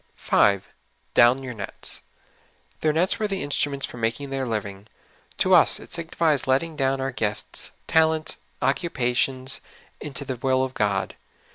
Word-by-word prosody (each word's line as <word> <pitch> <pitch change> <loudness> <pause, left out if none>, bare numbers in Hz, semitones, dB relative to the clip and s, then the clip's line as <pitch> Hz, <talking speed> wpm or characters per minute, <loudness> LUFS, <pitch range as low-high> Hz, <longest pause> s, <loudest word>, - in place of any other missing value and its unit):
5. 100 -2 +2 0.5
''Down 125 +3 +5
your 125 -2 -5
nets.'' 105 -3 -4 0.8
Their 155 - +2
nets 175 +8 +1
were 215 - 0
the 195 -5 -2
in 145 - -6
struments 140 -1 0
for - - -10
making 115 +5 -2
their 135 -1 -2
living. 100 -2 -4 0.5
To - - +3
us - - +7
it - - -13
signifies 165 -4 +1
letting 155 +5 +1
down 135 -1 0
our 135 0 -2
gifts, 105 -4 -3
talents, 160 -1 +3 0.3
occupations, 130 -3 0 0.4
into 140 -1 -5
the 130 -2 -4
will 130 +1 +1
of 130 -1 -3
God. 100 -4 0
135 Hz, 150 wpm, -24 LUFS, 120-150 Hz, 0.8 s, us